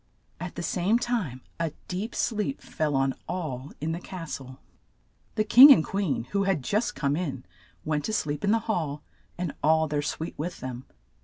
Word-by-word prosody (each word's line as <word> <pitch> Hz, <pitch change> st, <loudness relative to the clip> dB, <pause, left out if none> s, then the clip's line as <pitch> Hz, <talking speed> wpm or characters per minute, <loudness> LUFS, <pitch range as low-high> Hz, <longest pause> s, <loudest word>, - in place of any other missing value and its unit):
At -, -, -6 dB
the -, -, -4 dB
same 195 Hz, +5 st, +2 dB
time 225 Hz, -, -2 dB, 0.2 s
a 165 Hz, -3 st, -1 dB
deep 200 Hz, +6 st, -4 dB
sleep 225 Hz, +4 st, -1 dB
fell 150 Hz, -3 st, -2 dB
on 135 Hz, 0 st, +2 dB, 0.2 s
all 145 Hz, -7 st, -4 dB
in 155 Hz, +2 st, -2 dB
the 165 Hz, -, -3 dB
cas 175 Hz, -3 st, -6 dB
tle. 130 Hz, -1 st, -11 dB, 0.8 s
The 215 Hz, -, +2 dB
king 250 Hz, +6 st, +10 dB
and 200 Hz, -, +6 dB
queen, 195 Hz, -, -1 dB
who 200 Hz, -1 st, +1 dB
had 185 Hz, -8 st, +1 dB
just 210 Hz, -, 0 dB
come 140 Hz, -1 st, 0 dB
in, 150 Hz, -7 st, -3 dB, 0.4 s
went 150 Hz, -1 st, 0 dB
to 220 Hz, -, -2 dB
sleep 150 Hz, -6 st, -1 dB
in 200 Hz, -, +2 dB
the 225 Hz, -, +5 dB
hall, 155 Hz, -9 st, -2 dB, 0.3 s
and 175 Hz, -3 st, -3 dB
all 160 Hz, +1 st, +4 dB
their 150 Hz, -1 st, 0 dB
suite 155 Hz, +2 st, -4 dB
with 170 Hz, +3 st, -4 dB
them. 130 Hz, +1 st, -6 dB
165 Hz, 185 wpm, -27 LUFS, 145-200 Hz, 0.8 s, king